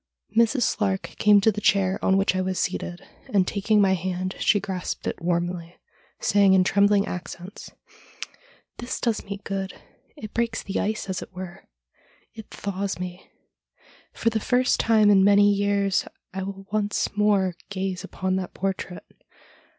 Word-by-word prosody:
Mrs. 235 +3 +3
Slark 195 -4 0 0.2
came 210 -1 +6
to 220 - +4
the 210 0 -5
chair 195 -1 +2
on 190 - +3
which 195 -1 +2
I 185 - +1
was 185 0 -2
seated, 175 0 -3 0.2
and 190 -3 +2
taking 210 +1 +1
my 195 -2 +4
hand 185 +1 -2
she 205 - +3
grasped 185 -2 -4
it - - -3
warmly, 175 0 -2 0.4
saying 200 -1 +4
in 185 - +5
trembling 200 +1 +3
accents: 180 +1 -7 0.5
' - - -20
This 240 +1 -4
does 230 -3 0
me 200 0 -7
good. 195 -1 -4 0.4
It 215 -7 -8
breaks 230 -1 -1
the 195 - -2
ice, 215 0 -2
as 190 -2 -3
it - - -9
were. 185 -1 -8 0.7
It 220 -2 -11
thaws 200 0 -4
me. 180 +1 -7 0.8
For 230 - 0
the 220 - 0
first 250 +3 +2
time 220 -2 +4
for 205 - +6
many 205 +1 +5
years 200 -1 +1 0.3
I 190 - -3
will 195 0 -6
once 210 -1 -1
more 205 -3 +2 0.2
gaze 190 -2 -3
upon 190 0 -2
that 185 -1 -5
portrait. 190 -2 -4
195 Hz, 160 wpm, -25 LUFS, 185-210 Hz, 0.8 s, came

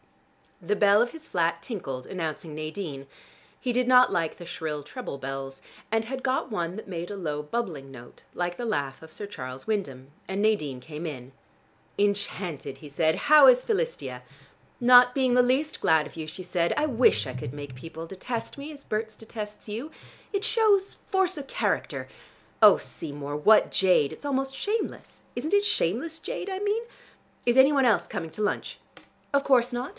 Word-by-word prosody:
The 205 +5 +1
bell 205 +1 +5
of 240 - +2
his 320 -1 -11
flat 170 -1 0
tinkled 135 - -5
announcing 160 -3 -4
Nadine. 155 -3 -5 0.5
He 250 - -1
did 250 0 +1
not 250 0 +7
like 165 -4 -1
the 175 - -9
shrill 160 -3 -4
treble 195 - -6
bells, 135 0 -6 0.3
and 225 0 +1
had 260 +2 -5
got 260 -1 0
one 175 -4 -2
that 220 - -8
made 175 -2 -5
a - - -4
low 150 -5 -2
bubbling 150 -6 -4
note 120 -2 -13
like 175 0 -2
the 245 - -4
laugh 140 - -2
of 160 0 -13
Sir 205 - -4
Charles 130 -9 -8
Wyndham; 140 -11 -3 0.2
and 195 +1 -2
Nadine 155 -12 +1
came 155 +5 -7
in. 130 -4 -7 0.7
"Enchanted!" 190 -8 -1
he 150 - -10
said. 160 +3 +2
"How 300 -2 +9
is 250 -1 +6
Philistia?" 475 +2 -2 0.6
"Not 250 0 +7
being 260 -2 +2
the 250 - +7
least 265 +5 0
glad 160 -1 +4
of - - -15
you," 160 -1 -5
she 185 +4 -8
said. 175 -1 0
"I 300 - +3
wish 230 - +3
I 130 - -5
could 125 -1 -6
make 145 -2 -7
people 165 +5 -8
detest 210 +7 -5
me, 285 +2 -7
as 285 -2 -11
Berts 220 0 -3
detests 215 -2 -8
you. 235 +9 -4 0.4
It 400 -1 -1
shows 415 -4 +3
force 380 -2 0
of 280 -2 -6
character. - - -1 0.5
Oh, - - +9
Seymour, 145 -2 -6
what 210 +9 +5
jade! 180 -7 +3
It - - -11
is - - -11
almost 270 -1 -1
shameless! 430 +8 -3
Isn't 315 - -3
it 405 0 +3
shameless 315 - 0
jade 390 - -5
I 380 0 -3
mean? 415 +3 0 0.6
Is 240 +1 +4
any 265 +2 +8
one 275 -3 +3
else 230 -4 +3
coming 165 - -4
to 185 - -6
lunch?" 210 - -2 0.5
"Of 280 0 +3
course 250 -3 +4
not. 245 +2 -3
205 Hz, 185 wpm, -27 LUFS, 155-255 Hz, 0.7 s, How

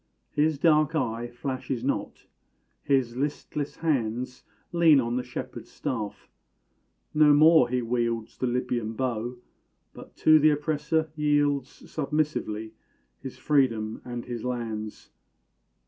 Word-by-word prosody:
His 150 0 +1
dark 155 0 +3
eye 120 -5 -1
flashes 130 0 -4
not; 140 - -3 0.6
his 130 -4 +1
listless 145 +1 -3
hands 125 -5 -2 0.3
Lean 165 -4 +6
on 120 -1 -1
the 125 - 0
shepherd's - - -7
staff; 110 -5 -5 0.9
no 150 -1 +6
more 155 -4 +6
he 125 0 0
wields 115 -1 -1
The 130 - -2
Libyan 120 -2 -1
bow 120 -1 -2 0.6
but - - -13
to 155 0 +6
th' 155 0 +5
oppressor 155 +1 -1
yields 145 -3 +1
Submissively 145 -8 -3 0.5
his 130 -1 -8
freedom 125 -6 +1
and 120 -1 -6
his 120 -2 -5
lands. 115 -4 -5
130 Hz, 115 wpm, -27 LUFS, 120-150 Hz, 0.9 s, Lean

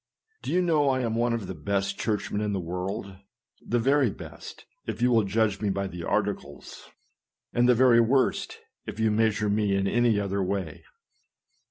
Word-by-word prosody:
Do - - -4
you 180 +1 +2
know 155 -5 +2
I 130 -1 +1
am 115 -2 -1
one 120 +1 +1
of 115 -4 -2
the 95 - -5
best 100 +4 -2
church 105 -2 -2
men 105 - -1
in 105 -1 -1
the 95 - -1
world; 95 +3 -5 0.5
the 120 - 0
very 135 +2 +3
best, - - -10 0.2
if 110 0 -4
you 125 +1 +3
will 115 -2 +4
judge 105 0 0
me 105 - 0
by 100 0 -1
the 90 -2 -7
articles, - - -3 0.6
and 120 +1 +3
the 125 - +6
very 120 -1 +5
worst, 130 +3 +1 0.3
if 105 - -6
you 110 -1 +2
measure 110 -1 +1
me 105 -1 +1
in 100 0 0
any 120 0 +2
other 100 0 -1
way. 95 -4 -3
105 Hz, 190 wpm, -26 LUFS, 100-120 Hz, 0.6 s, the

